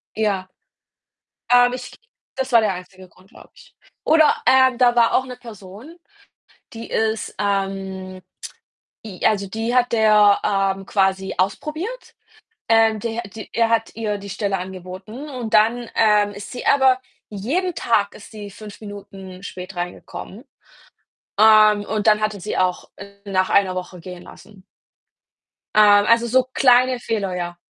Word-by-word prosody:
Ja. 200 -4 -1 1.0
Ähm, 245 0 +5
ich 250 0 -7 0.4
das 265 -1 -3
war 230 - +7
der 205 -3 0
einzige 185 +1 -11
Grund, 185 +3 -24
glaube - - -17
ich. - - -20 0.3
Oder, 315 0 +4
äh, 260 -1 +5
da 245 -1 +3
war 230 -1 +3
auch 260 - +2
'ne 250 -1 -8
Person, 225 - -12 0.8
die 230 0 -9
ist, 220 0 -2
ähm 195 -2 -3 0.8
i 190 -5 -10
also, 200 -3 +1
die 225 +4 -3
hat 245 -1 +2
der, 210 -2 +4
ähm, 195 -1 0
quasi 190 -1 0
ausprobiert. 310 - -4 0.6
Ähm, 225 -1 +4
der 235 +1 -4
die 215 +2 -10
er 230 0 +1
hat 225 -1 0
ihr 210 -2 -2
die 200 0 -10
Stelle 200 -1 -2
angeboten 190 +9 -9
und 245 -5 -6
dann, 230 +2 +3
ähm, 210 -2 +3
ist 200 +4 -9
sie 245 - -7
aber 265 -2 +4 0.3
jeden 310 - -2
Tag 205 -4 0
ist - - -13
sie 205 -2 -9
5 210 +1 -12
Minuten 195 -2 -10
spät 185 -1 -8
reingekommen. 180 +6 -7 1.0
Ähm, 215 -1 +6
und 215 +1 -2
dann 215 0 +4
hat 215 0 0
er 200 - -9
sie 210 - -4
auch 185 -1 -1 0.4
nach 185 -1 0
1 190 -2 +2
Woche 180 0 -7
gehen 180 0 -10
lassen. 200 -3 -16 1.1
Ähm, 205 -1 +6
also, 230 +1 +3
so 255 +2 +2
kleine 255 -1 +4
Fehler, 200 -6 -3
ja. 175 -1 -4
210 Hz, 150 wpm, -21 LUFS, 195-235 Hz, 1.1 s, war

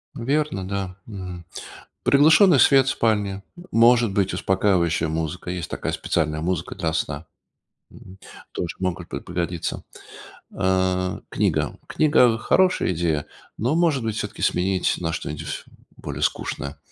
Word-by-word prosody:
Верно, 135 -6 -1
да, 95 -2 -4
м. 90 -4 -8 0.6
Приглушенный 155 +3 +6
свет 135 -1 +6
в - - +3
спальне, 100 -3 0 0.3
может 115 -1 +5
быть, 95 -1 +1
успокаивающая 90 -4 +1
музыка. 80 +2 -3
Есть 90 -3 -4
такая - - -3
специальная 75 -2 -1
музыка 85 -1 -2
для 80 -2 -2
сна, 80 -1 -3 0.7
м. 95 +1 -14 0.3
Тоже 85 - -4
могут 90 -2 -3
п - - -4
пригодиться. 85 -1 -4 0.7
Э, 95 -1 0
книга. - - 0
Книга- 125 -7 +3
хорошая 185 - +2
идея, 80 -3 -1 0.3
но, 125 +8 +1
может 165 -6 +2
быть, 110 -1 -2
всё-таки - - -5
сменить 95 +1 +1
на 85 -2 -2
что-нибудь 75 -1 -5 0.3
более - - -6
скучное. 70 0 -2
95 Hz, 130 wpm, -23 LUFS, 85-115 Hz, 0.7 s, Приглушенный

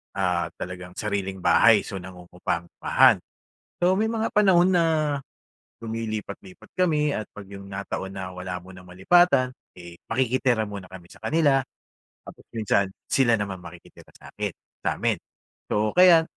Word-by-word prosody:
ah, 90 -3 0
talagang 90 0 -7
sariling 100 -3 -3
bahay. 115 -3 +6
So, 100 - -6
nangungupahan. 90 -1 +1 0.6
So, 180 +1 +4
may 220 - +2
mga 225 -1 -1
panahon 190 -3 +5
na 170 -1 +4 1.0
lumilipat-lipat 110 -2 -6
kami 150 -5 +2
at 110 - -3
pag 100 -2 -10
yung 100 0 -9
nataon 95 0 -5
na 95 -1 -5
wala 90 0 -5
munang 90 0 -13
malipatan, 130 - +4 0.3
eh, 85 -1 -11
makikitira 125 -2 +1
muna 100 -2 -7
kami 90 -2 -12
sa - - -15
kanila. 145 -4 +3 0.6
Tapos - - -12
minsan 105 -3 +1 0.2
sila 120 -4 +4
naman 100 -2 -4
makikitira 85 0 -14
sa'kin - - -6 0.3
sa'min. - - 0 0.5
So, 105 +1 +1
kaya 180 -2 +7
105 Hz, 130 wpm, -25 LUFS, 95-135 Hz, 1.0 s, kaya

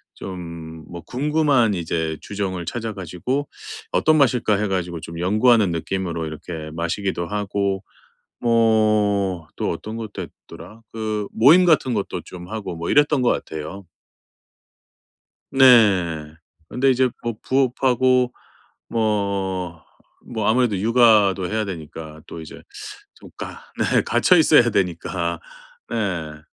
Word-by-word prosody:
좀 85 -3 -8
뭐 85 -1 -7
궁금한 140 - +1
이제 80 -2 -2
주종을 95 -4 -4
찾아 115 +5 -4
가지고 100 - -3 0.4
'어떤 155 - +3
맛일까?' 125 -6 +3
해 105 +1 -1
가지고 90 -3 -2
좀 85 +1 -8
연구하는 110 +3 +4
느낌으로 85 0 -3
이렇게 80 0 -7
마시기도 85 +2 -2
하고 100 -1 -2 0.6
뭐 105 -6 +2
또 - - -2
어떤 110 +6 -6
것도 105 -4 -6
했더라 105 +5 -13
그 110 -2 -3
모임 155 +11 +6
같은 150 -7 +3
것도 - - -3
좀 90 -1 -10
하고 105 -5 -5
뭐 85 +1 -5
이랬던 145 -1 +3
것 125 - +3
같아요. 80 +5 -5 1.7
네. 95 - +4 0.3
근데 135 +8 +1
이제 130 0 +2
뭐 120 0 -2
부업하고 130 -1 +2 0.6
뭐, 100 -6 -2 0.4
뭐 110 -3 -2
아무래도 115 -3 +2
육아도 105 -4 +4
해야 110 0 0
되니까 80 -3 -8
또 85 - -8
이제 80 - -11 0.5
좀 - - -15
가 - - -7 0.2
네 - - +2
갇혀 180 - +3
있어야 150 -7 +5
되니까. 85 -3 -1 0.5
네. 85 -9 -3
100 Hz, 245 characters per minute, -22 LUFS, 85-120 Hz, 1.7 s, 모임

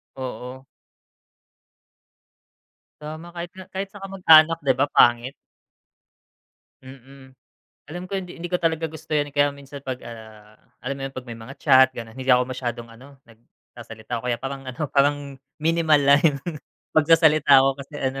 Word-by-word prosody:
Oo. 130 0 -8 2.4
Tama, 155 +3 -8
kahit 170 0 -6
nga, 185 0 -11
kahit 195 +1 -4
sa 205 - -12
kamag-anak 165 -5 +5
'di 135 - +4
ba, 135 +3 +1
pangit. 120 +2 +3 1.5
Mm. 130 0 -15 0.5
Alam 175 +4 -7
ko 200 - -9
hindi 180 -2 -10
hindi 175 +1 -7
ko 180 - 0
talaga 165 -1 0
gusto 160 0 -13
'yan, 145 -1 -1
eh. - - -35
Kaya 145 0 +3
minsan 140 0 -11
'pag, 130 -2 -5
ah, 110 -2 -12 0.3
alam 135 +2 -3
mo - - -8
yun, 135 - -14
'pag 130 -1 -8
may 120 - -7
mga 120 +5 -11
chat 130 -3 +6
gano'n, 115 -1 -9
hindi 130 0 -8
ako 125 0 +5
masyadong 120 -2 -5
ano, 135 +5 -16
nagsasalita 115 0 -10
o - - -14
kaya 120 -1 0
parang 135 0 -6
ano, 135 +4 -4
parang 145 0 +1 0.2
minimal 160 -1 +2
lang 140 0 +5
yung 145 -4 +2 0.6
pagsasalita 155 -3 +5
ko 135 0 +1
kasi 140 +2 -11
ano, 135 0 -3
140 Hz, 160 wpm, -23 LUFS, 125-155 Hz, 2.4 s, chat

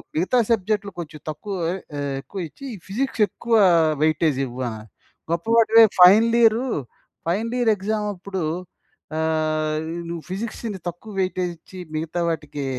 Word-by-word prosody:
మిగతా 185 +10 +2
సబ్జెక్ట్‌లు 210 -1 0
కొంచెం 155 -2 -7
తక్కువ 195 +6 -5 0.2
ఆహ్, - - -3 0.2
ఎ - - -2 0.2
ఎక్కువ 195 - -8
ఇచ్చి, 275 - -12 0.2
ఫిజిక్స్ 245 +3 -2
ఎక్కువ 235 +2 -4 0.5
వెయిటేజ్ 155 -3 +2
ఇవ్వు" 125 0 -7
ఆహ్, 110 -1 -8 0.5
గొప్ప 170 0 -1
వాడివే 225 0 +7 0.2
final 220 +6 +7
year 230 +3 +4 0.6
final 220 +8 -1
year 230 -2 +4
exam 210 +2 -2
అప్పుడు 190 +1 -5 0.8
ఆహ్, 155 -1 0 0.3
నువ్వు 170 -1 -5
ఫిజిక్స్‌ని 210 +1 -4
తక్కువ 175 +6 -7
వెయిటేజ్ 185 -1 -1
ఇచ్చి, 185 - -14 0.2
మిగతా 160 +2 -3
వాటికి 150 -3 -4
185 Hz, 135 wpm, -23 LUFS, 160-220 Hz, 0.8 s, వాడివే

